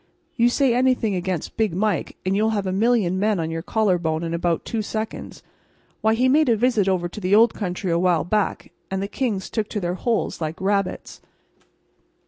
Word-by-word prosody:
You 235 +1 +4
say 260 0 +2
anything 250 -4 +2
against 180 -2 -3
Big 215 -6 0
Mike, 205 -1 -1
and 190 +1 +1
you'll 215 +2 +2
have 200 - -2
a 185 - -1
million 200 -3 +2
men 210 -1 +1
on 165 0 -2
your 165 0 -3
collarbone 175 -5 0
in 165 0 -3
about 170 0 -1
two 225 - -2
seconds. 220 +1 -5 0.6
Why, 220 0 +3
he 250 +3 +2
made 295 +1 +4
a 230 - +3
visit 220 -4 +2
over 180 -2 0
to 190 +5 -9
the 185 +2 +3
old 225 +1 +5
country 180 -2 -3
awhile 170 -2 +2
back, 210 +5 -1 0.2
and 190 - -2
the 200 - -2
kings 205 -3 -2
took 215 -2 -3
to 210 - -3
their 175 -2 -2
holes 225 -1 -1
like 160 +2 -3
rabbits. 195 -1 -2
200 Hz, 195 wpm, -23 LUFS, 180-220 Hz, 0.6 s, old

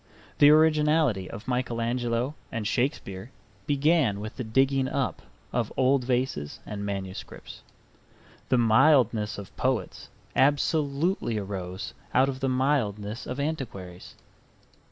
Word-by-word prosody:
The 145 - +8
originality 150 - +3
of 105 - -9
Michael 125 -2 -1
Angelo 120 +2 -1 0.2
and 115 -3 -3
Shakespeare 120 -6 -2 0.4
began 145 -7 +2
with 105 +1 -7
the 130 - -4
digging 135 +4 +2
up 135 -1 -2 0.3
of - - -1
old 130 0 +3
vases 125 - -1
and 100 -1 -5
manuscripts. 95 -2 -6 0.9
The 130 - +4
mildness 115 -2 +4
of 100 -2 -10
poets 130 -7 -2 0.3
absolutely 145 - +1
arose 95 -2 -5 0.2
out 130 +2 +5
of 130 -1 -4
the 135 -1 0
mildness 120 -5 -1
of 125 +2 -4
antiquaries. 110 - -5
125 Hz, 115 wpm, -27 LUFS, 105-140 Hz, 0.9 s, The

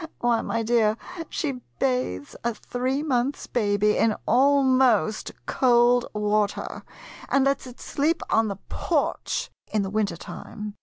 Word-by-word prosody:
Why, 235 -2 +2
my 230 0 -2
dear, 220 -1 +2 0.3
she 275 -6 -3 0.2
bathes 250 - -1
a 235 -1 -1
three 260 +6 -2
months' 265 -2 0
baby 210 -2 +1
in 220 -2 +3
al 275 +4 +4
most 255 -5 +2
cold 245 -1 +4
water, 210 0 0 0.5
and 275 -1 +3
lets 275 -1 0
it 250 - -12
sleep 315 +4 0
on 225 0 +3
the 200 -2 -4
porch - - -1 0.2
in 215 -2 +1
the 195 - -4
winter 205 -5 0
time! 210 +4 -8
240 Hz, 140 wpm, -25 LUFS, 210-260 Hz, 0.5 s, al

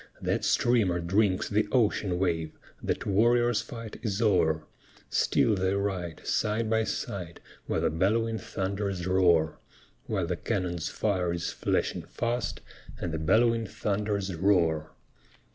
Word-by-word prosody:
That - - -1
streamer 110 -8 +2
drinks 95 +2 +1
the 105 0 +1
ocean 105 -6 +2
wave, 85 -4 -1 0.2
That - - -2
warrior's 120 +3 +3
fight 115 -2 -8
is 105 -3 -2
o'er! 85 -8 +2 0.5
Still 110 - +3
they 95 0 +1
ride, 95 -5 -3
side 110 +1 0
by 110 0 +2
side, 90 -9 -4 0.3
While - - 0
the - - +1
bell'wing 110 +7 +1
thunders 95 -2 -3
roar, 85 -4 +3 0.5
While 95 -5 0
the 90 0 -2
cannon's 90 -4 -2
fire 95 -5 0
is 85 0 -2
flashing - - -1
fast, 120 +1 -3 0.4
And 85 - -3
the 80 - -2
bell'wing 115 +7 +3
thunders 100 -2 -2
roar. 80 -4 +2
95 Hz, 130 wpm, -28 LUFS, 85-110 Hz, 0.5 s, warrior's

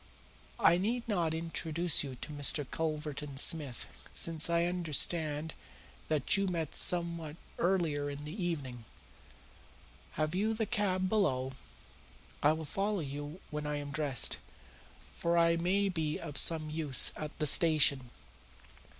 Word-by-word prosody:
I 170 +2 +5
need 235 +5 -2
not 175 -7 0
introduce 165 0 +1
you 135 -2 -6
to - - -6
Mr. 145 0 +2
Culverton 150 -2 -4
Smith, 140 -4 -1
since 165 -1 0
I 170 0 +2
understand 160 -2 0 0.5
that 155 +5 +2
you 195 -1 +1
met 165 -4 -3
somewhat 170 -3 +1 0.2
earlier 165 -6 0
in 145 +1 -7
the 150 +1 -7
evening. 145 - -4 1.3
Have 155 +1 -1
you 215 +4 0
the 220 0 -1
cab 195 -4 0
below? 135 -11 0 0.9
I 145 - +5
will 160 0 -5
follow 195 +4 -2
you 145 +4 -7
when 150 0 -4
I 150 - -2
am 145 -1 -5
dressed, 140 -4 +3 0.8
for 170 0 0
I 170 0 +4
may 185 +4 +1
be 160 -5 -2
of 150 -4 -8
some 155 -1 +1
use 150 -4 +3
at 150 0 -7
the 155 - -1
station. 145 -4 +5
160 Hz, 135 wpm, -32 LUFS, 145-175 Hz, 1.3 s, I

